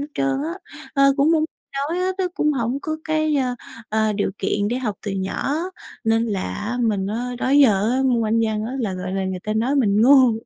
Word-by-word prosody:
hết 285 Hz, -, -3 dB
trơn 275 Hz, 0 st, 0 dB
á. 320 Hz, +3 st, -3 dB, 0.4 s
Ờ, 275 Hz, -1 st, +5 dB
cũng 290 Hz, +3 st, +3 dB
muốn 315 Hz, -1 st, +3 dB, 0.5 s
nói 345 Hz, -, -1 dB
á, 365 Hz, +1 st, +1 dB
tức 365 Hz, -1 st, 0 dB
cũng 300 Hz, 0 st, +1 dB
hổng 245 Hz, +1 st, -1 dB
có 315 Hz, 0 st, -2 dB
cái, 310 Hz, -1 st, +1 dB
ờ, 255 Hz, -2 st, 0 dB, 0.3 s
ờ, 220 Hz, 0 st, +1 dB
điều 200 Hz, -1 st, -1 dB
kiện 205 Hz, 0 st, 0 dB
để 245 Hz, +2 st, -1 dB
học 220 Hz, -6 st, -2 dB
từ -, -, -1 dB
nhỏ, 195 Hz, +8 st, -2 dB, 0.5 s
nên 225 Hz, 0 st, +3 dB
là 210 Hz, +2 st, -3 dB
mình 205 Hz, -4 st, 0 dB
á, 245 Hz, +4 st, -3 dB
đó 255 Hz, -, -1 dB
giờ 230 Hz, -7 st, +5 dB
á 260 Hz, +1 st, +1 dB
môn 245 Hz, -3 st, +2 dB
Anh 225 Hz, +1 st, +2 dB
văn 215 Hz, -1 st, -1 dB
á, 235 Hz, -, -4 dB
là, 210 Hz, -5 st, -1 dB
gọi 185 Hz, 0 st, -5 dB
là, 195 Hz, 0 st, -1 dB
người 185 Hz, -1 st, -3 dB
ta 215 Hz, -, -1 dB
nói 240 Hz, +6 st, +1 dB
mình 210 Hz, -5 st, +3 dB
ngu. 260 Hz, -2 st, +7 dB
235 Hz, 230 wpm, -22 LUFS, 210-275 Hz, 0.5 s, ngu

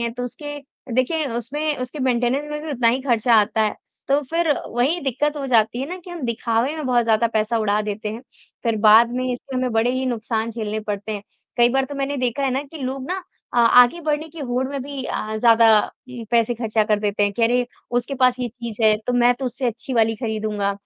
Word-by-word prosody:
हैं 235 Hz, 0 st, -2 dB
तो 245 Hz, 0 st, -4 dB
उसके 290 Hz, +4 st, -6 dB, 0.4 s
देखिए 295 Hz, +5 st, +1 dB
उसमें 295 Hz, +6 st, -2 dB
उसके 255 Hz, +4 st, -5 dB
मेंटेनेंस 255 Hz, +2 st, +1 dB
में 300 Hz, 0 st, -4 dB
भी 315 Hz, -, -5 dB
उतना 245 Hz, -4 st, +2 dB
ही 250 Hz, +3 st, +1 dB
ख़र्चा 240 Hz, -3 st, +2 dB
आता 220 Hz, +1 st, 0 dB
है। 210 Hz, -1 st, 0 dB, 0.3 s
तो 280 Hz, +1 st, +3 dB
फ़िर 330 Hz, -1 st, +1 dB, 0.2 s
वही 255 Hz, +9 st, +1 dB
दिक़्क़त 290 Hz, +2 st, -1 dB
हो 280 Hz, -2 st, -3 dB
जाती 235 Hz, -1 st, +2 dB
है 270 Hz, -, -2 dB
ना 360 Hz, -, -5 dB
कि 360 Hz, -, -10 dB
हम 345 Hz, -3 st, -7 dB
दिखावे 235 Hz, +4 st, 0 dB
में 305 Hz, -3 st, -4 dB
बहुत 245 Hz, -2 st, +2 dB
ज़्यादा 225 Hz, 0 st, +3 dB
पैसा 220 Hz, +1 st, +1 dB
उड़ा 210 Hz, -1 st, +1 dB
देते 210 Hz, 0 st, -4 dB
हैं, 220 Hz, +2 st, -6 dB, 0.4 s
फ़िर 230 Hz, -2 st, 0 dB
बाद 225 Hz, +2 st, +7 dB
में 255 Hz, 0 st, -1 dB
इसमें 255 Hz, +2 st, -6 dB
हमें 255 Hz, 0 st, 0 dB
बड़े 225 Hz, +2 st, +2 dB
ही 255 Hz, +1 st, -1 dB
नुकसान 230 Hz, -2 st, -2 dB
झेलने 215 Hz, -1 st, -3 dB
पड़ते 210 Hz, 0 st, -4 dB
हैं। 205 Hz, -1 st, -5 dB, 0.3 s
कई 240 Hz, -1 st, +5 dB
बार 270 Hz, +2 st, +1 dB
तो 285 Hz, -, -8 dB
मैंने 280 Hz, +1 st, -2 dB
देखा 250 Hz, +1 st, -1 dB
है 270 Hz, -, +1 dB
ना 265 Hz, +2 st, -1 dB
कि 320 Hz, -, -8 dB
लोग 260 Hz, 0 st, -4 dB
ना 375 Hz, +1 st, -2 dB, 0.3 s
अ, -, -, +2 dB
आगे 245 Hz, +6 st, +6 dB
बढ़ने 310 Hz, 0 st, -1 dB
की 325 Hz, +2 st, -13 dB
होड़ 255 Hz, -1 st, -1 dB
में 280 Hz, 0 st, -4 dB
भी 280 Hz, 0 st, -6 dB
अ, 215 Hz, -3 st, -3 dB
ज़्यादा 230 Hz, 0 st, +5 dB, 0.4 s
ये 245 Hz, -2 st, -8 dB
पैसे 235 Hz, 0 st, +2 dB
ख़र्चा 225 Hz, -2 st, 0 dB
कर 210 Hz, 0 st, +1 dB
देते 205 Hz, 0 st, -1 dB
हैं 205 Hz, 0 st, +2 dB
कि 230 Hz, -, -2 dB
अरे! 245 Hz, +2 st, +2 dB, 0.2 s
उसके 245 Hz, +3 st, -1 dB
पास 255 Hz, -1 st, +3 dB
ये 245 Hz, -, -1 dB
चीज़ 235 Hz, -1 st, -7 dB
है 215 Hz, -1 st, +5 dB
तो 250 Hz, -, 0 dB
मैं 245 Hz, 0 st, +4 dB
तो 265 Hz, -, -6 dB
उससे 250 Hz, +1 st, -3 dB
अच्छी 240 Hz, +3 st, -4 dB
वाली 225 Hz, -1 st, +3 dB
ख़रीदूँगा। 215 Hz, -3 st, -2 dB
245 Hz, 235 wpm, -22 LUFS, 225-270 Hz, 0.4 s, बाद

